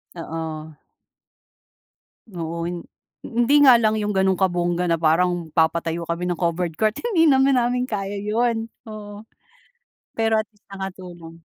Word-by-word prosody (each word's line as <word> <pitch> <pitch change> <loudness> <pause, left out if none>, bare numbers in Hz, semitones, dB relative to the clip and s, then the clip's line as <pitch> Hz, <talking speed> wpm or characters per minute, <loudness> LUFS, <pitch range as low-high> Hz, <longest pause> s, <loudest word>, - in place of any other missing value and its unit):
Oo. 160 -2 -6 1.5
Oo. 170 -3 -5
Hin 175 -1 -5 0.4
hindi 240 +5 +2
nga 265 -4 +8
lang 220 -2 +2
'yung 210 -1 -2
gano'ng 190 -1 +2
kabongga 175 -1 +1
na 165 - +3
parang 165 +1 +1
papatayo 165 +1 0
kami 170 +1 -3
ng 175 -2 -2
covered 170 0 0
court, 215 0 +2 0.2
hindi 330 -4 +4
naman 270 -1 +4
namin 245 +1 0
kaya 205 -4 -3
'yun. 225 +2 -1 0.2
Oo, 210 0 -9 0.8
pero 225 -1 +1
at - - -32
least 210 0 -35
nakatulong. 180 -4 -9
190 Hz, 135 wpm, -22 LUFS, 170-220 Hz, 1.5 s, nga